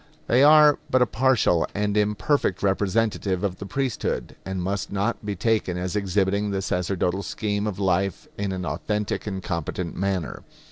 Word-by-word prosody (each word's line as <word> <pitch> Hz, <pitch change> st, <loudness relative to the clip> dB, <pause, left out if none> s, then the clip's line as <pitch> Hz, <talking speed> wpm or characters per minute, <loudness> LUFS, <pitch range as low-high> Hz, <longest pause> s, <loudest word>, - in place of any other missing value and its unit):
They 125 Hz, +3 st, +3 dB
are 150 Hz, 0 st, +7 dB
but 130 Hz, -1 st, +4 dB
a -, -, +3 dB
partial 120 Hz, -9 st, +2 dB
and 105 Hz, 0 st, 0 dB
imperfect 105 Hz, +1 st, +1 dB
representative 100 Hz, -1 st, 0 dB
of 95 Hz, -2 st, -1 dB
the 100 Hz, -, -6 dB
priesthood, 130 Hz, +3 st, -2 dB
and 95 Hz, 0 st, -4 dB
must 95 Hz, +1 st, -2 dB
not 100 Hz, +4 st, -1 dB
be 105 Hz, -1 st, -3 dB
taken 105 Hz, -3 st, 0 dB
as 90 Hz, +2 st, -3 dB
exhibiting 100 Hz, +1 st, +1 dB
the 95 Hz, -1 st, -2 dB
sacerdotal 90 Hz, +1 st, -1 dB
scheme 105 Hz, +1 st, -2 dB
of 100 Hz, -3 st, -3 dB
life 95 Hz, -1 st, 0 dB
in 100 Hz, -1 st, -2 dB
an 95 Hz, -1 st, -4 dB
authentic 105 Hz, +2 st, -2 dB
and 95 Hz, -2 st, -4 dB
competent 85 Hz, 0 st, -3 dB
manner. 95 Hz, -4 st, -2 dB
100 Hz, 160 wpm, -24 LUFS, 95-105 Hz, -, are